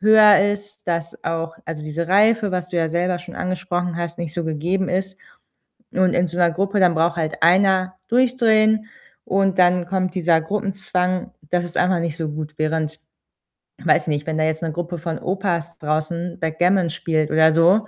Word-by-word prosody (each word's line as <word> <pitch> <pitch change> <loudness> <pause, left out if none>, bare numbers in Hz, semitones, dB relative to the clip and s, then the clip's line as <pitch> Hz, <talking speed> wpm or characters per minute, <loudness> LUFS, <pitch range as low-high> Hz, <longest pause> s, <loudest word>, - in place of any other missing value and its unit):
höher 210 -1 +7
ist, 205 +1 -9
dass 170 -1 -3
auch 165 0 -3
also, 155 -2 -6
diese 160 +3 -4
Reife, 210 +2 +3
was 180 0 -3
du 175 - -3
ja 165 -1 +1
selber 175 +2 0
schon 175 0 -11
angesprochen 180 -1 -2
hast, 170 0 -4
nicht 170 -3 -4
so 170 - -2
gegeben 170 +5 -1
ist 190 +1 -2 0.7
und 185 -1 +2
in 175 +1 +2
so 175 - -6
'ner 175 -1 +4
Gruppe, 195 +3 0
dann 180 -2 +4
braucht 170 +1 +1
halt 160 -2 -3
einer 185 +1 +3
durchdrehen 225 -3 +3 0.4
und 195 0 +1
dann 180 -1 +3
kommt 185 0 -1
dieser 170 -3 +2
Gruppenzwang, 185 -1 -2 0.2
das 175 -1 +1
ist 175 - -7
einfach 180 0 +2
nicht 165 -2 -3
so 160 -3 -3
gut. 155 0 -6
Während, 155 0 -2 0.8
weiß - - +2
nicht, 150 -1 -1
wenn 160 -1 -2
da 155 - +2
jetzt 160 0 -1
'ne 165 - -2
Gruppe 175 +2 -4
von 165 0 -4
Opas 175 -3 -2
draußen 160 +3 -3
Backgammon 175 +3 +1
spielt 155 -1 -1
oder 160 0 +5
so, 185 +6 +4
175 Hz, 180 wpm, -21 LUFS, 165-190 Hz, 0.8 s, höher